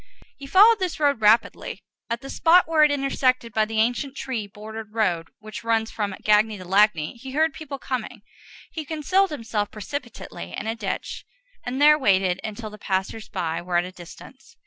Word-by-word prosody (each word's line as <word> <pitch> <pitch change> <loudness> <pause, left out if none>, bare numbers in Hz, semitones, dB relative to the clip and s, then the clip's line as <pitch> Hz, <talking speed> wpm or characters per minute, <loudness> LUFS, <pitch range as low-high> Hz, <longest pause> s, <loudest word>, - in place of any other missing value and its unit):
He 275 - -10
followed 420 +8 +6
this 370 -4 -2
road 285 -6 +2
rapidly. 215 +2 +2 0.3
At 235 0 -2
the 270 - -9
spot 345 +1 +4
where 320 -2 +4
it 300 - +6
is 285 - +1
intersected 255 -4 0
by 220 0 +2
the 220 0 -5
ancient 245 +5 0
tree 235 -6 -4
bordered 215 +1 -9
road 180 -7 0
which 215 +1 -9
runs 225 -1 0
from 205 -3 -3
Gagny 210 0 +3
to 185 - -10
Lagny, 190 -2 +2
he 260 +2 -9
heard 315 +1 +2
people 290 -2 -7
coming. 245 -4 -5 0.5
He 315 - -5
concealed 330 +6 +1
himself 225 -7 -3
precipitately 210 - -7
in - - -5
a 225 - -1
ditch, 210 -4 -5 0.4
and 250 +2 -4
there 300 +1 +6
waited 190 -6 +2
until 215 0 -6
the 210 - -12
passers 195 +3 -3
by 165 -4 -3
were 175 0 -1
at 175 - +1
a 180 - -8
distance. 180 +9 -14
225 Hz, 190 wpm, -24 LUFS, 205-280 Hz, 0.5 s, followed